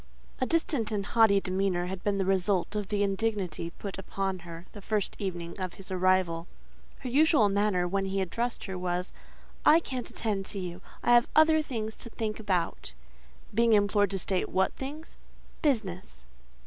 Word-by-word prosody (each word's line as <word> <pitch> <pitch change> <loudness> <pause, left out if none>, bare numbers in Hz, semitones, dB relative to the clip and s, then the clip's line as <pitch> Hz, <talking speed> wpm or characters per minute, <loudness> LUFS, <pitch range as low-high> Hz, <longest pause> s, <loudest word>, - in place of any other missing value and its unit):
A 255 - +1
distant 285 -9 +1
and 200 -2 -1
haughty 220 -3 +5
demeanour 185 -1 0
had 185 0 -5
been 205 -1 +1
the 195 - 0
result 190 +1 +1
of 205 -2 -2
the 205 0 0
indignity 195 -5 -1
put 195 +3 -7
upon 195 -1 -3
her 170 0 -10
the 205 - -10
first 210 0 -1
evening 175 -4 -4
of 185 -2 -4
his 190 -1 -11
arrival: 185 -2 +2 0.5
her 260 - -5
usual 275 - +4
answer, 200 -4 +2
when 195 +2 0
he 195 0 -1
addressed 230 +6 -2
her, 190 -2 -5
was—"I 180 - 0
can't 255 -7 -5
attend 205 -4 -2
to - - -2
you; 180 -1 -6 0.2
I 240 - +4
have 240 0 +6
other 315 0 +6
things 220 -7 -4
to 235 - -9
think 220 -1 -3
about." 180 - -1 0.6
Being 230 0 +4
implored 205 -1 +3
to 195 - -1
state 185 0 0
what 190 0 +1
things: 295 +4 -7 0.4
"Business." 190 - -1
195 Hz, 170 wpm, -29 LUFS, 185-225 Hz, 0.6 s, have